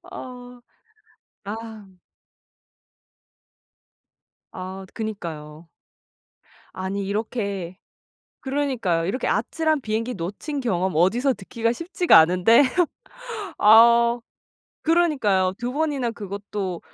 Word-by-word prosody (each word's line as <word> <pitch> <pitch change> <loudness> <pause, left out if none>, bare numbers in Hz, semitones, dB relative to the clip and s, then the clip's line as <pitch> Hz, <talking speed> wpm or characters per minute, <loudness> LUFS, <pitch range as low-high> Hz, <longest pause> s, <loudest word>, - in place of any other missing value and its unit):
어. 245 -1 -10 0.8
아. 215 -3 -8 2.5
아 190 +1 -7
그니까요. 165 -7 -6 1.1
아니 190 +1 -4
이렇게 200 -4 -3 0.6
그러니까요. 260 -12 -1
이렇게 205 +9 -2
아찔한 315 -2 0
비행기 225 +2 -2
놓친 205 - -5
경험 190 -7 -1
어디서 235 - +3
듣기가 230 +2 -2
쉽지가 350 - +3
않은데 180 - +5 1.0
아 235 +2 +6
어 240 - -15 0.6
그러니까요 270 - +2
2 245 +1 -3
번이나 285 -5 -1
그것도 200 -3 -5
215 Hz, 195 characters per minute, -23 LUFS, 190-250 Hz, 2.5 s, 아